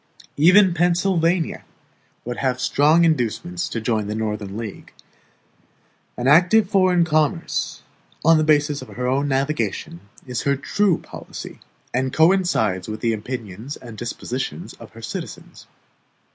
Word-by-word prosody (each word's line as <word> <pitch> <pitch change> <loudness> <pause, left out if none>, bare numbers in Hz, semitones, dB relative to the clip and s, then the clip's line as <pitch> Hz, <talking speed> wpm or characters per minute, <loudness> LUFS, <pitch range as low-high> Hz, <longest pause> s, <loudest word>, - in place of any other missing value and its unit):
Even 185 +5 +6
Pennsylvania 175 -1 +1 0.6
would 120 0 -4
have 130 -2 -1
strong 150 +6 +4
inducements 165 - -1
to 115 - -3
join 110 -2 -1
the 105 - -3
Northern 105 -2 -3
league. 115 -3 -7 1.3
An 125 - -1
active 180 +8 +5
foreign 185 -3 +4
commerce, 155 +1 -1 0.4
on 165 0 +6
the - - +2
basis 150 -2 +2
of 130 - -9
her 115 +4 -5
own 135 +3 +1
navigation, 135 - -2 0.3
is 125 -2 -3
her 140 0 +1
true 180 +6 +1
policy, - - -10 0.3
and 130 +1 0
coincides 160 - +2
with 110 0 -6
the 115 -1 +1
opinions 110 +2 -6
and 115 -3 -11
dispositions 125 - -5
of 115 - -13
her 115 0 -12
citizens. 115 - -8
140 Hz, 130 wpm, -22 LUFS, 115-170 Hz, 1.3 s, Even